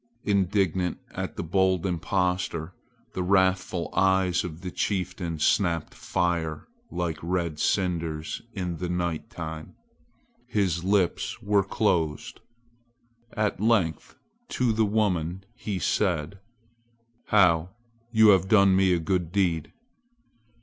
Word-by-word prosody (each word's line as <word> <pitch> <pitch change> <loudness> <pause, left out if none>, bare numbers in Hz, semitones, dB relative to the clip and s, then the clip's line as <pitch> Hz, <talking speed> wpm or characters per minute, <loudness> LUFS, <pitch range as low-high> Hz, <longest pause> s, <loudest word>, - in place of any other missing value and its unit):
Indignant 95 -3 +1
at - - -5
the - - -4
bold 95 +1 +1
impostor, 90 -2 -1 0.4
the 95 - -2
wrathful 95 -1 +1
eyes 95 -2 +2
of 85 -2 -7
the 90 0 -5
chieftain 90 -4 -2
snapped 85 +1 +1
fire 85 -3 -2 0.2
like 85 -3 -3
red 85 -2 -2
cinders 85 -5 -1
in 90 -3 -3
the 90 +1 -4
night 85 +2 -2
time. 80 -7 -7 0.7
His 90 -5 0
lips 95 -2 0
were 100 0 +3
closed. 85 -7 -1 0.9
At 105 -4 -1
length 105 -8 +1 0.4
to 125 -2 +2
the 110 0 +2
woman 95 -4 0
he 105 -4 -4
said: 90 0 0 0.9
"How, 90 -4 +4 0.4
you 110 -2 +6
have 95 -1 +5
done 100 -3 +5
me 95 -1 +4
a 85 - +1
good 90 0 -1
deed." 85 -5 0
90 Hz, 115 wpm, -26 LUFS, 85-100 Hz, 0.9 s, you